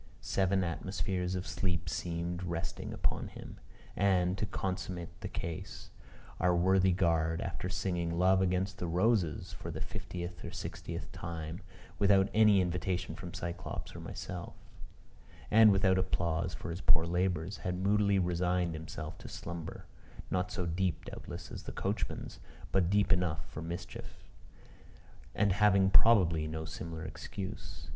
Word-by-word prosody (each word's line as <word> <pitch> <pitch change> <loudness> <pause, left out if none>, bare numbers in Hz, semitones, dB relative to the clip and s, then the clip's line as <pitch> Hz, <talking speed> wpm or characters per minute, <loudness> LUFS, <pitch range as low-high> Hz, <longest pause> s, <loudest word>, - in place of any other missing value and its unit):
Seven 95 0 +1
atmospheres 90 +1 -2
of 90 0 -3
sleep 85 -3 -1
seemed 85 +2 -2
resting 85 -2 -3
upon - - -1
him; - - -10 0.4
and, 90 -2 +3
to 105 - -1
consummate 90 -3 -3
the - - -3
case, 85 -1 -6 0.5
our 90 0 +4
worthy 95 +2 +4
guard, 80 -2 +2
after 90 0 -3
singing 85 -3 -1
"Love 95 +1 +5
amongst 95 +1 0
the 90 - -2
Roses," 90 - +1
for - - -7
the - - -4
fiftieth 85 0 -5
or - - -4
sixtieth 85 -1 -6
time, 80 0 -5 0.4
without 100 -1 +5
any 105 -3 +6
invitation 90 +1 -1
from 90 - -7
Cyclops 85 0 -5
or - - -6
myself, 90 -2 -6 1.0
and 110 0 +8
without 95 -1 +4
applause 85 -3 0
for - - -5
his 85 +3 -5
poor 80 0 +5
labors, 90 +1 0
had 90 -1 -2
moodily 100 +1 +3
resigned 90 -1 +1
himself 80 0 -6
to - - -9
slumber 85 -2 -6 0.5
not 90 0 +1
so 90 - -2
deep 85 0 -1
doubtless - - -7
as - - -6
the - - -7
coachman's, - - -3 0.3
but 90 -2 +3
deep 100 -1 +4
enough 85 -3 0
for 75 - -7
mischief; 85 +1 -6 1.2
and 100 -2 +3
having, 100 -1 +5
probably, 85 -10 +5
no 80 0 -4
similar 80 +1 -6
excuse. 100 +2 -6
90 Hz, 140 wpm, -33 LUFS, 85-95 Hz, 1.2 s, and